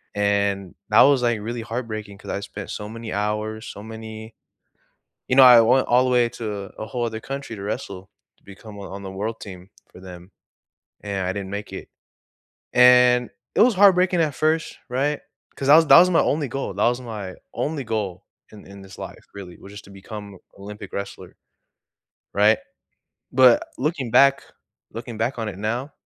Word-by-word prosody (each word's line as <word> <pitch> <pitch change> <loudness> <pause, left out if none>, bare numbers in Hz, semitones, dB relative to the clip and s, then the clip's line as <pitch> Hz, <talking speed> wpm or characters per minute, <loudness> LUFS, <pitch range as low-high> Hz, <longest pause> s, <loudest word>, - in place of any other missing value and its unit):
And 100 -2 0 0.2
that - - +6
was, 140 -1 +4
like, 120 -2 +1
really 115 +2 -5
heartbreaking 110 -3 -6
'cause - - -8
I - - -2
spent 100 0 -8
so 105 0 -6
many 115 0 -7
hours, 105 +1 -3
so 100 - -10
many 110 0 -9 0.9
you 130 - +1
know 135 - +9
I 125 -2 +9
went 125 +4 +3
all 125 +1 +4
the - - 0
way 120 -1 +3
to 115 0 -8 0.3
a - - -4
whole 120 0 -3
other 110 -1 -4
country 135 -3 -6
to - - -8
wrestle, 95 -2 -6 0.3
to - - -36
become 100 +2 -13
on 100 - -8
on 100 +1 -7
the 95 - -6
world 110 +4 -4
team 95 -2 -10 0.2
for - - -14
them, 90 0 -12 0.7
and 100 -3 -3
I 95 - -1
didn't 100 -1 -6
make 100 +1 -6
it. - - -8 0.9
And, 125 0 +5 0.3
it - - +3
was 240 -1 +4
heartbreaking 185 -2 +4
at 150 -3 -1
1st, 160 +3 -1
right? 140 +4 -1 0.4
'Cause 135 - -3
that 145 - +9
was 165 0 +5
that - - +9
was 180 +1 +4
my 170 - +4
only 145 -1 0
goal, 135 -5 -4
that 105 +4 +2
was 120 +1 -2
my 105 -6 -7 0.2
only 150 -2 -3
goal 100 -5 -4 0.3
in 105 -2 -14
in 100 0 -12
this 95 -1 -14
life, - - -9
really, 95 -3 -10
was 100 - -13
just 105 - -11
to - - -16
become 100 0 -10 0.2
Olympic 100 0 -10
wrestler, 100 0 -7 1.0
right? 105 +2 +4 0.8
But, 125 -2 +5
looking 140 -3 -2
back 140 +2 +5 0.5
looking 115 0 -7
back 120 +3 -2
on 110 -2 -3
it 95 -3 -8
now 120 +7 -3
110 Hz, 190 wpm, -22 LUFS, 100-125 Hz, 1.0 s, know